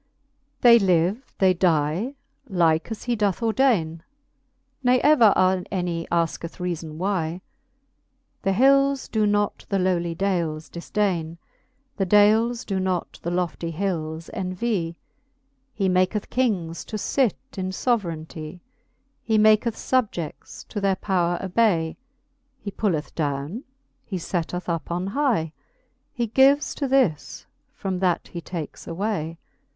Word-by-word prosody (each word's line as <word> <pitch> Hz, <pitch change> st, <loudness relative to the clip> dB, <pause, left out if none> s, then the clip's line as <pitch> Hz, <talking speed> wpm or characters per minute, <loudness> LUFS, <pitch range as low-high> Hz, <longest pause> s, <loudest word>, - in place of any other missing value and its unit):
They 235 Hz, -1 st, +8 dB
live, 190 Hz, +5 st, +1 dB
they 190 Hz, -1 st, +4 dB
die, 175 Hz, -, +1 dB, 0.3 s
like 165 Hz, -3 st, +2 dB
as 225 Hz, -, -6 dB
he 245 Hz, -1 st, 0 dB
doth 205 Hz, -4 st, 0 dB
ordaine, 220 Hz, -10 st, +2 dB, 0.8 s
Ne 250 Hz, 0 st, +4 dB
ever 280 Hz, -8 st, +6 dB, 0.4 s
any 175 Hz, -3 st, -2 dB
asketh 170 Hz, 0 st, -1 dB
reafon 170 Hz, -4 st, -4 dB
why. 180 Hz, -2 st, -1 dB, 1.0 s
The 195 Hz, -, +1 dB
hils 275 Hz, +5 st, +3 dB
doe 215 Hz, -1 st, +2 dB
not 205 Hz, 0 st, 0 dB
the 200 Hz, -, +1 dB
lowly 175 Hz, -2 st, 0 dB
dales 165 Hz, -5 st, -1 dB
difdaine 170 Hz, -2 st, -2 dB, 0.3 s
\ 270 Hz, +1 st, -44 dB
The 195 Hz, -2 st, 0 dB
dales 220 Hz, +4 st, +4 dB
doe 195 Hz, -2 st, -1 dB
not 185 Hz, -2 st, -2 dB
the 170 Hz, -, -3 dB
lofty 175 Hz, -1 st, -2 dB
hils 160 Hz, -3 st, -3 dB
envy. 185 Hz, -2 st, -2 dB, 0.7 s
He 200 Hz, -6 st, -1 dB
maketh 185 Hz, +3 st, +1 dB
kings 195 Hz, -10 st, 0 dB
to 215 Hz, -, -5 dB
fit 250 Hz, +2 st, +1 dB, 0.2 s
in 185 Hz, -2 st, -3 dB
foverainty; 170 Hz, -6 st, -2 dB, 0.6 s
He 220 Hz, -1 st, +1 dB
maketh 215 Hz, +1 st, +4 dB
fubjeds 210 Hz, -, -2 dB
to 205 Hz, -, -4 dB
their 195 Hz, -1 st, +2 dB
powre 175 Hz, -3 st, 0 dB
obay; 185 Hz, -5 st, +1 dB, 0.6 s
He 205 Hz, -, -6 dB
pulleth 175 Hz, -8 st, -1 dB
downe, 145 Hz, -, -3 dB, 0.4 s
he 190 Hz, -, -4 dB
fetteth 180 Hz, +1 st, -3 dB
up 165 Hz, -4 st, -2 dB
on 175 Hz, +2 st, -2 dB
hy; 210 Hz, -, 0 dB, 0.6 s
He 240 Hz, -, -1 dB
gives 270 Hz, +5 st, +4 dB
to 280 Hz, -, -2 dB
this, 255 Hz, -, +1 dB, 0.3 s
from 190 Hz, -2 st, -3 dB
that 180 Hz, -2 st, 0 dB
he 170 Hz, -, -6 dB
takes 165 Hz, -3 st, -7 dB
away. 170 Hz, -3 st, -3 dB
190 Hz, 125 wpm, -24 LUFS, 170-220 Hz, 1.0 s, They